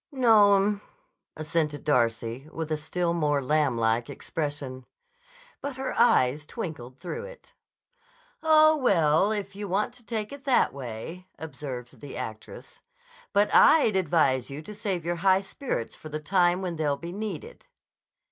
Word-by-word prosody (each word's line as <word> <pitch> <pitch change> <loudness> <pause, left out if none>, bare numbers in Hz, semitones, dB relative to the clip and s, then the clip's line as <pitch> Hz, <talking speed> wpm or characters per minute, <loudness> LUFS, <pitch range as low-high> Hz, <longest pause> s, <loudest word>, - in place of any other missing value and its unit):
"No'm," 210 -5 +4 0.6
assented 155 -1 -1
Darcy 120 0 0
with 160 -1 -5
a - - +2
still 170 +3 -1
more 150 -4 +1
lamblike 120 -5 +1
expression. 145 -4 -4 0.8
But 280 -1 -4
her 265 0 -3
eyes 150 - +3
twinkled 140 - -7
through 470 +1 -5
it. - - -13 0.9
"Oh, 310 -1 +6
well, 185 - +3
if 200 -2 -3
you 205 0 -5
want 205 +6 0
to 245 - -15
take 220 -2 -4
it 280 -1 -10
that 265 -3 +3
way," 140 +8 -7
observed 135 -5 -8
the 145 -2 -8
actress. 110 0 -8 0.5
"But 205 +1 +2
I'd 285 -10 +6
advise 150 -8 +2
you 140 +3 -7
to 210 - -9
save 190 -5 -3
your 175 0 -1
high 190 +2 +3
spirits 195 - -4
for 155 - -11
the 155 0 -4
time 180 +3 +2
when 175 -3 -3
they'll 145 -3 0
be 170 +3 -7
needed." 200 -4 -6
170 Hz, 145 wpm, -27 LUFS, 145-210 Hz, 0.9 s, Oh